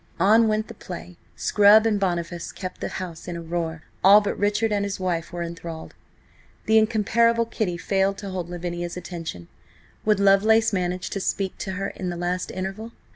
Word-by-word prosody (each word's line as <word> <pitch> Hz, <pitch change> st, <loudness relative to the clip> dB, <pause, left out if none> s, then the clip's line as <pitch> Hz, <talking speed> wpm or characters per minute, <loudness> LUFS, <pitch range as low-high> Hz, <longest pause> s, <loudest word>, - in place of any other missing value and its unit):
On 220 Hz, +5 st, +5 dB
went 215 Hz, 0 st, 0 dB
the -, -, -9 dB
play. 180 Hz, -3 st, -9 dB, 0.2 s
Scrub 210 Hz, +1 st, +5 dB
and 215 Hz, -2 st, +2 dB
Boniface 175 Hz, -2 st, -2 dB
kept 185 Hz, 0 st, -7 dB
the -, -, -2 dB
house 175 Hz, -3 st, -7 dB
in 175 Hz, -, -4 dB
a -, -, -6 dB
roar; 165 Hz, -1 st, -3 dB, 0.2 s
all 200 Hz, +3 st, +9 dB
but 205 Hz, -1 st, -2 dB
Richard 210 Hz, +2 st, +1 dB
and 205 Hz, -1 st, +1 dB
his 200 Hz, -1 st, -3 dB
wife 175 Hz, -3 st, -2 dB
were 175 Hz, 0 st, -4 dB
enthralled. 170 Hz, -1 st, -7 dB, 0.7 s
The 220 Hz, 0 st, +5 dB
incomparable 230 Hz, +1 st, +2 dB
Kitty 210 Hz, -6 st, -2 dB
failed 195 Hz, +2 st, 0 dB
to 200 Hz, -1 st, -6 dB
hold 180 Hz, -2 st, -4 dB
Lavinia's 175 Hz, 0 st, -4 dB
attention. 165 Hz, -, -7 dB, 0.6 s
Would 210 Hz, -2 st, +2 dB
Lovelace 215 Hz, +3 st, +4 dB
manage 180 Hz, -1 st, -2 dB
to 195 Hz, -, -2 dB
speak 190 Hz, 0 st, -2 dB
to 190 Hz, -, -4 dB
her 195 Hz, +1 st, -3 dB
in 185 Hz, -, -5 dB
the 175 Hz, -, -4 dB
last 180 Hz, +1 st, -2 dB
interval? 195 Hz, +5 st, -5 dB
190 Hz, 180 wpm, -24 LUFS, 175-210 Hz, 0.7 s, all